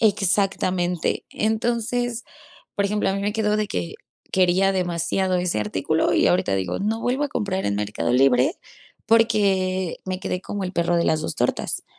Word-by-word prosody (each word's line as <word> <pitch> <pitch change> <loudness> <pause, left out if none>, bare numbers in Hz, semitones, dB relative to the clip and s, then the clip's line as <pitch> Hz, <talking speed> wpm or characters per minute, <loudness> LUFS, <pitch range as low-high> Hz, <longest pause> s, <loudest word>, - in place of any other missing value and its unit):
Exactamente. 190 -4 +1
Entonces, 235 +2 -1 0.5
por 200 - 0
ejemplo, 210 +1 0
a 195 - -1
mí 195 - -2
me 205 +1 0
quedó 210 -1 +1
de 215 -1 -1
que, 90 -1 -4 0.4
quería 185 +1 +3
demasiado 180 +1 0
ese 180 -11 0
artículo 105 -2 0
y - - +3
ahorita 95 +2 +1
digo: 95 -2 -2
"No 220 +3 -1
vuelvo 255 +5 0
a 290 - -2
comprar 200 -6 -2
en 100 0 0
Mercado 105 +3 -2
Libre, 125 -1 +3 0.5
porque 195 -5 +2
me 185 -1 -3
quedé 180 - -3
como 200 -1 -4
el 185 - -4
perro 170 -1 +1
de 170 - +2
las 155 -1 +1
dos - - -4
tortas, - - -1
190 Hz, 170 wpm, -23 LUFS, 170-210 Hz, 0.5 s, quería